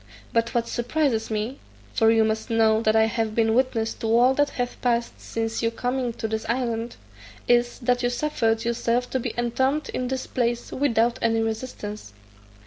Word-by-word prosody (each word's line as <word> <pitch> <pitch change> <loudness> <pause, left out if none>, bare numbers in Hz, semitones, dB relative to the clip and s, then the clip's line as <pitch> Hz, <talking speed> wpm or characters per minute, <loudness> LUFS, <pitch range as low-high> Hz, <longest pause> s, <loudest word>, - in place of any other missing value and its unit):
But 230 +1 0
what 235 -1 +1
surprises 240 -2 0
me 220 +5 -3 0.3
(for 225 - +4
you 225 0 +5
must 220 +2 -1
know 220 -1 +3
that 220 -1 +2
I 220 - +6
have 225 -1 -1
been 225 -1 +3
witness 235 -3 +1
to 225 - -5
all 240 +3 +5
that 290 +1 +2
hath 245 -1 -4
passed 240 -1 0
since 225 0 -3
your 230 - +2
coming 250 +2 -2
into 225 -1 -3
this 220 0 -2
island), 235 -1 -1 0.5
is, 240 0 +3
that 245 -1 +1
you 245 - +1
suffered 235 -4 0
yourself 235 +1 0
to 260 - 0
be - - -3
entombed 260 +5 0
in 255 - -2
this 260 0 -3
place 240 -1 -1
without 240 -4 +1
any 225 -1 +2
resistance." 220 - -5
235 Hz, 180 wpm, -24 LUFS, 225-245 Hz, 0.5 s, I